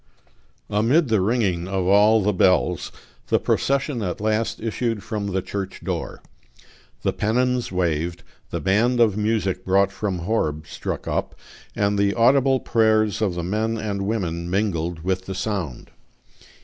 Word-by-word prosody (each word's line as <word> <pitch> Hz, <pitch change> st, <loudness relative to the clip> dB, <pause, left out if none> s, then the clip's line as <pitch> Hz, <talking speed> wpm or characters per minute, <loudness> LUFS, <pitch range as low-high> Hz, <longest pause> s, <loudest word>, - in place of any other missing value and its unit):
Amid 125 Hz, +9 st, +3 dB
the 110 Hz, -3 st, +3 dB
ringing 95 Hz, -5 st, 0 dB
of 95 Hz, -1 st, -1 dB
all 105 Hz, +3 st, +5 dB
the 105 Hz, +1 st, +2 dB
bells, 90 Hz, -2 st, +2 dB, 0.4 s
the -, -, +3 dB
procession 135 Hz, -2 st, 0 dB
at 90 Hz, -4 st, -3 dB
last 110 Hz, +1 st, 0 dB
issued 115 Hz, -1 st, -2 dB
from 105 Hz, -2 st, -3 dB
the 95 Hz, -2 st, -1 dB
church 100 Hz, -1 st, -5 dB
door. -, -, -4 dB, 0.8 s
The -, -, +1 dB
pennons 125 Hz, +2 st, 0 dB
waved, 85 Hz, -1 st, -1 dB, 0.3 s
the -, -, -3 dB
band 115 Hz, +6 st, +2 dB
of 110 Hz, -4 st, +4 dB
music 105 Hz, -3 st, 0 dB
brought 95 Hz, +1 st, +3 dB
from 100 Hz, -2 st, -3 dB
Horb 85 Hz, -5 st, -1 dB
struck -, -, -5 dB
up, -, -, -2 dB, 0.4 s
and 100 Hz, 0 st, +1 dB
the 100 Hz, 0 st, +2 dB
audible 130 Hz, +2 st, +4 dB
prayers 110 Hz, -2 st, +2 dB
of 100 Hz, -5 st, 0 dB
the 85 Hz, -, -3 dB
men 110 Hz, +5 st, -1 dB
and 100 Hz, -2 st, -3 dB
women 85 Hz, -6 st, -2 dB
mingled 90 Hz, -4 st, -1 dB
with 95 Hz, 0 st, -2 dB
the 95 Hz, -, -4 dB
sound. 95 Hz, -, -4 dB
100 Hz, 150 wpm, -23 LUFS, 95-110 Hz, 0.8 s, all